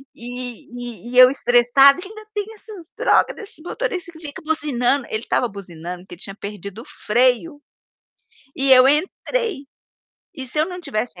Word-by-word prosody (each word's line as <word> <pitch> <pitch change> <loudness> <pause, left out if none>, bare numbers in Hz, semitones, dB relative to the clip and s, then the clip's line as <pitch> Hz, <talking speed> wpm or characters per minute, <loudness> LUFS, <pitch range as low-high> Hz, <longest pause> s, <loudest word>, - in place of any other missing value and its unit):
e 245 -1 -8
e - - -9
e 250 - -3
eu 255 0 +10
estressada: 270 +3 +5
"Ainda 430 +2 -11
tem 415 -1 -2
essas 405 -5 -12
droga - - +3
desses 435 0 -8
motoristas 370 -4 -3
que 320 - -13
fica 285 - -9
buzinando", 280 -4 0
ele 220 +2 -3
estava 245 - +1
buzinando, 180 -3 -8
porque 180 - -11
ele 175 - -21
tinha 195 - -6
perdido 200 +2 -8 0.2
freio. 255 +7 +2 1.0
E 270 0 +3
eu 255 +1 +8
entrei, 370 - -1 0.7
e 265 -4 -6
se 280 +5 -3
eu 310 - +4
não 360 -1 -7
tivesse 225 - -4
255 Hz, 160 wpm, -21 LUFS, 235-320 Hz, 1.0 s, eu